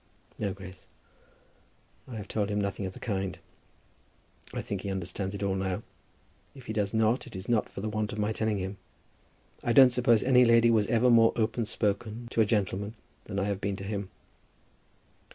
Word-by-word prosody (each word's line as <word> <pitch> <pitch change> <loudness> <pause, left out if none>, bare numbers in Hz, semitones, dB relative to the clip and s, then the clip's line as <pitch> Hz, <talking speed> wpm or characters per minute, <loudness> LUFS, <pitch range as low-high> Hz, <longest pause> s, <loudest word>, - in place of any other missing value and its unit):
"No, 100 -2 -1
Grace. 95 0 -10 1.2
I 125 - -8
have 105 -2 -6
told 105 -1 -1
him 105 0 0
nothing 100 -1 -2
of 95 - -7
the - - -11
kind. 95 -4 -2 1.1
I - - -4
think 100 -2 -4
he 100 - -4
understands 95 +1 -3
it 100 - -4
all 100 -1 +1
now. 95 -1 -2 0.7
If 130 -2 -12
he 110 - -4
does 105 -2 0
not, 110 +4 +1
it 120 - -11
is 95 +2 -7
not 115 -3 +1
for - - -7
the 110 - -3
want 110 0 -2
of 105 - -6
my 105 +1 0
telling 110 -1 0
him. 95 +1 -4 0.9
I 120 - +1
don't 130 0 +8
suppose 120 -3 +3
any 125 -1 +6
lady 115 0 +5
was 110 -3 +3
ever 120 +1 +3
more 115 -1 +6
open 115 +1 0
spoken 110 +3 -2
to 115 - +2
a - - +5
gentleman 105 0 -1 0.3
than 100 - -5
I 100 - +1
have 100 -1 -2
been 100 0 -1
to 95 - -8
him." 100 -1 -4
105 Hz, 195 wpm, -29 LUFS, 100-115 Hz, 1.2 s, don't